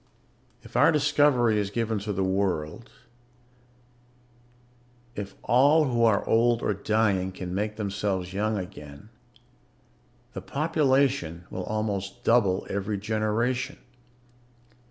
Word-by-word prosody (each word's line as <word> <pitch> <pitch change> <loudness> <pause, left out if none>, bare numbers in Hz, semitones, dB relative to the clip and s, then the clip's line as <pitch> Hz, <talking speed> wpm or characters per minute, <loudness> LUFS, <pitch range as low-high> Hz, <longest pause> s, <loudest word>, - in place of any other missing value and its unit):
"If - - -15
our - - +5
discovery 145 -7 +3
is 100 -1 -2
given 110 0 -2
to 105 +1 -4
the 95 -1 -1
world, 95 +2 -2 2.2
if 100 -3 -7
all 140 +6 +4
who 120 -3 0
are 110 -3 +2
old 120 +1 +2
or - - +1
dying 100 -2 0
can 90 -1 -6
make 105 +2 -2
themselves 100 -3 -3
young 105 +2 -1
again, 75 -6 -9 1.2
the - - -6
population 135 - 0
will 90 - -5
almost 100 -2 -3
double 100 -6 +2
every 100 +1 -3
generation. 110 +4 -1
105 Hz, 110 wpm, -26 LUFS, 95-120 Hz, 2.2 s, our